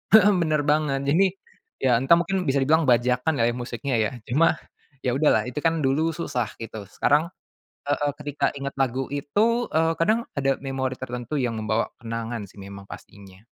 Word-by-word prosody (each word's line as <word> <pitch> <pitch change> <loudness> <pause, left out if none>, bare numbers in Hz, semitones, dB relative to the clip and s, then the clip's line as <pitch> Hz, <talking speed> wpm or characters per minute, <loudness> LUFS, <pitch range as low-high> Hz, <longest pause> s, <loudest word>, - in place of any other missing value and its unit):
mhm, 210 -1 +7
bener 155 -3 +1
banget 145 -2 +1
jadi 190 +5 +4 0.6
ya 130 - +4
entah 135 +6 +5
mungkin 180 +1 -1
bisa 135 0 +2
dibilang 160 +1 +3
bajakan 125 +4 +2
lah 115 - +2
ya 120 - -3
musiknya 120 +1 -3
ya, 110 - +1 0.2
cuma 165 +5 +4 0.5
ya 125 - +1
udahlah 155 - +4
itu 140 - -4
kan 165 0 0
dulu 150 +5 +2
susah 125 -9 -2
gitu 110 -2 -7
sekarang 150 +9 +2 0.6
heeh, 145 0 +1
ketika 145 -1 -1
ingat 140 0 -4
lagu 130 0 0
itu 215 +12 +1
eee, 165 +1 +2
kadang 225 +6 +2
ada 135 -1 +1
memori 135 -1 -3
tertentu 125 +2 -5
yang 120 -4 -1
membawa 110 +1 -1
kenangan 115 -1 -4
sih - - -20
memang 100 0 -10
pastinya. 100 +1 -13
135 Hz, 170 wpm, -24 LUFS, 120-155 Hz, 0.6 s, mhm